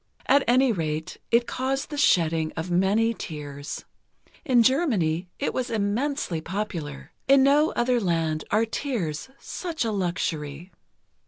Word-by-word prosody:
At 280 Hz, +1 st, +4 dB
any 255 Hz, +1 st, +4 dB
rate, 160 Hz, -5 st, -3 dB
it 235 Hz, +1 st, +4 dB
caused 270 Hz, +4 st, -2 dB
the -, -, -3 dB
shedding 165 Hz, -, +3 dB
of 165 Hz, +2 st, -3 dB
many 200 Hz, +6 st, +3 dB
tears. 145 Hz, -6 st, -7 dB, 0.6 s
In 250 Hz, -6 st, +4 dB
Germany, 200 Hz, -, +1 dB
it 280 Hz, -, -2 dB
was 255 Hz, -1 st, -2 dB
immensely 220 Hz, -, -1 dB
popular—in 190 Hz, -, -1 dB
no 290 Hz, +3 st, +4 dB
other 240 Hz, +1 st, +2 dB
land 165 Hz, -5 st, 0 dB
are 220 Hz, +2 st, +3 dB
tears 225 Hz, -, -3 dB
such 335 Hz, -8 st, -4 dB
a 225 Hz, -, 0 dB
luxury. 170 Hz, -4 st, -3 dB
205 Hz, 130 wpm, -25 LUFS, 160-260 Hz, 0.6 s, At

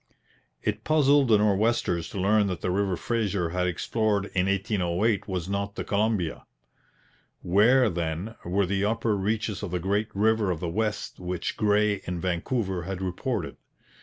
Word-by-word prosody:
It 105 Hz, +1 st, -2 dB
puzzled 145 Hz, -3 st, +4 dB
the 110 Hz, -2 st, +5 dB
Nor'westers 105 Hz, -4 st, +1 dB
to 100 Hz, -, -5 dB
learn 105 Hz, +2 st, +3 dB
that 90 Hz, -3 st, -3 dB
the 90 Hz, -, -1 dB
river 95 Hz, -1 st, 0 dB
Fraser 100 Hz, -7 st, -1 dB
had 90 Hz, +1 st, 0 dB
explored 100 Hz, +3 st, -1 dB
in 95 Hz, 0 st, +1 dB
1808 100 Hz, +1 st, 0 dB
was 90 Hz, -3 st, -3 dB
not 100 Hz, +1 st, -3 dB
the -, -, -3 dB
Columbia. 100 Hz, -5 st, -1 dB, 1.0 s
Where, 115 Hz, +8 st, +4 dB
then, 85 Hz, +3 st, -3 dB
were 95 Hz, +3 st, +1 dB
the 95 Hz, +2 st, -1 dB
upper 110 Hz, 0 st, +1 dB
reaches 105 Hz, 0 st, -1 dB
of 105 Hz, -, -4 dB
the 90 Hz, -, -1 dB
great 100 Hz, +4 st, 0 dB
River 110 Hz, 0 st, +2 dB
of 85 Hz, -3 st, -1 dB
the 90 Hz, -, -3 dB
West 105 Hz, +4 st, -2 dB
which 90 Hz, -1 st, -3 dB
Gray 105 Hz, -1 st, +2 dB
and 90 Hz, -1 st, -3 dB
Vancouver 95 Hz, +2 st, -1 dB
had 95 Hz, +2 st, -5 dB
reported? 95 Hz, -2 st, -3 dB
100 Hz, 160 wpm, -26 LUFS, 90-110 Hz, 1.0 s, the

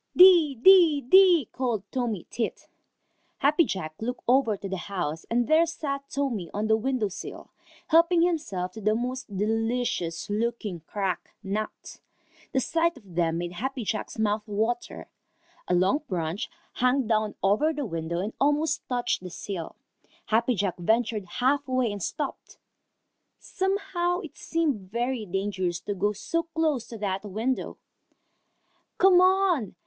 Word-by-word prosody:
"Dee, 350 Hz, -6 st, +7 dB
dee, 330 Hz, +2 st, +7 dB
dee," 350 Hz, -, +6 dB
called 240 Hz, -6 st, -2 dB
Tommy 235 Hz, -8 st, -2 dB
Tit. 235 Hz, -, -3 dB, 0.7 s
Happy 300 Hz, +4 st, +4 dB
Jack 155 Hz, -, -4 dB
looked 245 Hz, +2 st, -4 dB
over 245 Hz, -4 st, +3 dB
to 195 Hz, -, -6 dB
the 190 Hz, 0 st, -3 dB
house, 165 Hz, -5 st, -3 dB
and 240 Hz, +1 st, +1 dB
there 320 Hz, +2 st, +4 dB
sat 280 Hz, -4 st, -4 dB
Tommy 245 Hz, -, -2 dB
on 215 Hz, +2 st, 0 dB
a -, -, +6 dB
window 240 Hz, -1 st, 0 dB
sill, 195 Hz, +1 st, -9 dB, 0.4 s
helping 335 Hz, +1 st, +5 dB
himself 215 Hz, -, -1 dB
to 220 Hz, -, -9 dB
the 215 Hz, +1 st, +2 dB
most 245 Hz, -3 st, -4 dB
delicious 225 Hz, -5 st, -1 dB
looking 215 Hz, -3 st, -2 dB
cracked 195 Hz, -4 st, -2 dB, 0.2 s
nuts. 210 Hz, +2 st, -5 dB, 0.5 s
The 265 Hz, -, +1 dB
sight 330 Hz, +4 st, 0 dB
of 200 Hz, -8 st, -16 dB
them 165 Hz, -1 st, +1 dB
made 175 Hz, 0 st, -3 dB
Happy 255 Hz, +7 st, -4 dB
Jack's 215 Hz, +2 st, -3 dB
mouth 215 Hz, -1 st, +1 dB
water. 225 Hz, -, -2 dB, 0.6 s
A 180 Hz, -, +2 dB
long 190 Hz, +11 st, +3 dB
branch 175 Hz, 0 st, -3 dB, 0.2 s
hung 255 Hz, +1 st, +2 dB
down 215 Hz, -1 st, 0 dB
over 210 Hz, +11 st, +3 dB
the 295 Hz, -3 st, -3 dB
window 165 Hz, -2 st, -3 dB
and 210 Hz, +4 st, -4 dB
almost 295 Hz, +2 st, +2 dB
touched 245 Hz, -4 st, 0 dB
the 185 Hz, -, -7 dB
sill. 175 Hz, -1 st, -6 dB, 0.5 s
Happy 235 Hz, +3 st, +2 dB
Jack 195 Hz, -2 st, -1 dB
ventured 220 Hz, +2 st, +1 dB
half 265 Hz, +9 st, 0 dB
way 255 Hz, -3 st, +1 dB
and 205 Hz, -1 st, -6 dB
stopped. 290 Hz, -, -5 dB, 0.8 s
Somehow 380 Hz, -2 st, -1 dB
it 325 Hz, -, -10 dB
seemed 285 Hz, -, -2 dB
very 240 Hz, -1 st, -2 dB
dangerous 190 Hz, -2 st, -2 dB
to 205 Hz, -, -3 dB
go 200 Hz, +2 st, 0 dB
so 210 Hz, +11 st, -2 dB
close 320 Hz, -6 st, -1 dB
to 230 Hz, -, -8 dB
that 195 Hz, -2 st, -2 dB
window. 220 Hz, +6 st, -2 dB, 1.2 s
"Come 370 Hz, -2 st, +6 dB
on! 370 Hz, -, +2 dB
235 Hz, 145 wpm, -26 LUFS, 200-290 Hz, 1.2 s, Dee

